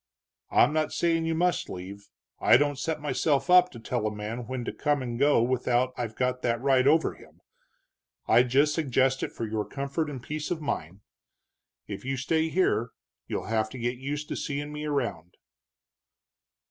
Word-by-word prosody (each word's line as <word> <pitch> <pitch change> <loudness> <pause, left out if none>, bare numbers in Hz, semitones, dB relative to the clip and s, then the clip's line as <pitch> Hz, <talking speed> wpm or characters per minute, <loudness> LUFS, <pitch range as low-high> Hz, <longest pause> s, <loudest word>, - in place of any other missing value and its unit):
I'm 150 - +4
not 155 -1 0
saying 165 -1 +1
you 165 0 0
must 175 +2 +1
leave, 95 +3 -8 0.3
I - - +6
don't 145 0 0
set 160 +1 -2
myself 145 0 0
up 180 0 +7
to 120 - -11
tell 115 0 -2
a - - -2
man 110 +3 -5
when 130 -1 -4
to - - -4
come 145 -2 0
and 120 -1 -4
go 140 -4 +4
without 125 0 +1
I've 115 -3 -4
got 125 0 -1
that 115 -2 0
right 135 0 +3
over 160 +2 +3
him. - - -18 0.9
I 120 - +6
just 135 +4 +3
suggest 135 -3 +1
it - - -3
for 115 - -4
your 110 -1 -2
comfort 140 +6 -3
and 140 -3 -6
peace 150 +2 -4
of 175 - -2
mind. 95 - -4 0.8
If - - -7
you 135 +1 -2
stay 160 +5 0
here 155 -10 +1 0.4
you'll - - -3
have 110 -1 0
to 130 - -9
get 120 +1 -2
used 145 +3 -4
to - - -3
seeing 145 +1 -4
me 150 0 -5
around." 120 - -3
135 Hz, 185 wpm, -27 LUFS, 120-150 Hz, 0.9 s, up